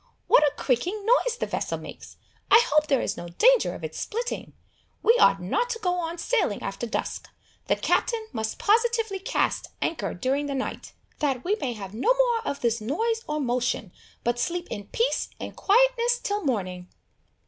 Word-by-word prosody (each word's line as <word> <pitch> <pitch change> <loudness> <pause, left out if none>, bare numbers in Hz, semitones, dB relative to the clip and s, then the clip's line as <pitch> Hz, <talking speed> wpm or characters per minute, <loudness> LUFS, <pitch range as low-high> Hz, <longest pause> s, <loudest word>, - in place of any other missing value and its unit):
What - - +6
a 295 -2 +4
creaking 360 - -1
noise 485 +1 +3
the - - -1
vessel - - -2
makes! - - -11 0.3
I - - +9
hope 305 0 +4
there 275 -4 +2
is - - -2
no 175 - -6
danger 485 - +3
of - - -10
its - - -5
splitting! 475 +2 -4 0.5
We 460 - +6
ought 195 - +5
not 195 - -1
to 460 -1 -3
go 365 -5 0
on 340 -1 -3
sailing 370 - 0
after 195 +4 -4
dusk. - - -3 0.4
The - - +3
Captain 455 -2 0
must 220 -2 -3
positively 450 -2 +2
cast 385 - -1
anchor 225 -12 -2
during 270 +9 -1
the 280 - -3
night, 265 - -4 0.3
that 270 -5 0
we 395 +4 +1
may 250 - -1
have 195 -3 -8
no 245 - +2
more - - +2
of 280 - -3
this 235 -1 +1
noise 450 - -1
or 300 0 -1
motion, 245 -7 -1 0.3
but 240 0 0
sleep 345 +5 -2
in 205 -2 -5
peace 470 - 0
and - - -7
quietness 485 +2 +3
till 410 -3 -2
morning." 185 - -2
325 Hz, 180 wpm, -26 LUFS, -, 0.5 s, I